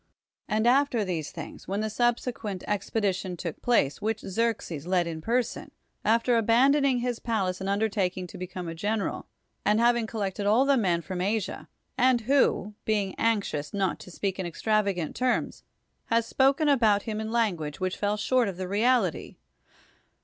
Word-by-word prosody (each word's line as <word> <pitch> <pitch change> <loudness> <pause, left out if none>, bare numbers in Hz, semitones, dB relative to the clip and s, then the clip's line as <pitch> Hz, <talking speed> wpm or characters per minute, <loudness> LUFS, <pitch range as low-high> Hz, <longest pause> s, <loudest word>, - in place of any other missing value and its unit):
And 215 +1 0
after 245 -3 +3
these 165 -5 -3
things, 160 -2 -9
when 200 +3 -1
the 215 - -1
subsequent 235 -4 -1
expedition 195 -3 -1
took 170 -2 -6
place, 225 - +2
which 220 +1 -1
Xerxes 190 -7 -2
led 180 -1 +2
in 160 -1 -5
per 245 +7 +2
son, - - -8 0.3
after 230 +2 +3
abandoning 255 +3 +3
his 245 -1 -2
palace 195 -6 -1
and 190 - -2
underta 200 -2 +1
king 185 0 -6
to 175 - -10
become 180 -1 -6
a 165 - -4
general, 205 +5 -2 0.4
and 210 +1 +3
having 235 -1 +3
collected 205 -2 -3
all 230 +6 +4
the 280 0 +4
men 180 -8 +1
from 185 0 -4
Asia; 205 +1 -2 0.3
and 255 -1 +4
who, 230 -4 +2
being 205 -3 0
anxious 200 -9 0
not 190 -3 0
to - - -11
speak 190 +2 -3
in 190 - -2
extravagant 200 -1 0
terms, 255 -1 0 0.4
has 230 0 +1
spoken 275 +5 +2
about 225 -8 +4
liim 215 -1 -3
in 220 0 -4
language 180 -11 -1
which 185 0 -1
fell 205 0 0
short 245 +2 +2
of 190 -3 -4
the 185 -1 -4
reality? 210 - +1
210 Hz, 170 wpm, -27 LUFS, 185-235 Hz, 0.4 s, all